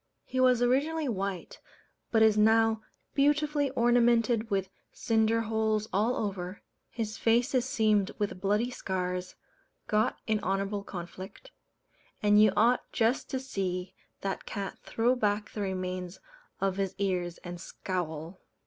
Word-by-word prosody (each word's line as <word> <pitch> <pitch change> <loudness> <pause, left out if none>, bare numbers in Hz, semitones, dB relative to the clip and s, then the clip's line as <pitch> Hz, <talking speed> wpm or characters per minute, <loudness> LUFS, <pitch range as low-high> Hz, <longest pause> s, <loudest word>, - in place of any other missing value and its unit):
He 255 - -3
was 250 -2 +4
originally 290 +5 +1
white, 195 -5 -3 0.5
but 225 -1 +4
is 220 -1 +5
now 220 +1 +4 0.3
beautifully 290 0 +2
ornamented 235 -2 +3
with 195 -1 0 0.2
cinder 225 0 +1
holes 220 -1 0
all 215 +6 +2
over; 190 -2 -4 0.3
his 220 -2 -4
face 240 +4 +2
is 255 -2 +2
seamed 215 -5 +2
with 200 -3 -3
bloody 210 +5 +1
scars, 180 -4 -3 0.5
got 215 0 +1
in 215 -1 +1
honourable 200 +1 -1
conflict; 185 - -9 0.7
and 210 0 +6
you 215 -2 +6
ought 235 +4 +3
just 230 +3 +1
to 265 - -2
see 185 -8 -3 0.3
that 195 -1 -4
cat 200 -2 -5
throw 240 +3 +1
back 210 -3 0
the 210 - -5
remains 185 -2 -3 0.4
of 195 -1 0
his 195 -2 -1
ears 180 -3 -1
and 175 -1 -7
scowl. 175 -2 -5
210 Hz, 135 wpm, -29 LUFS, 190-235 Hz, 0.7 s, and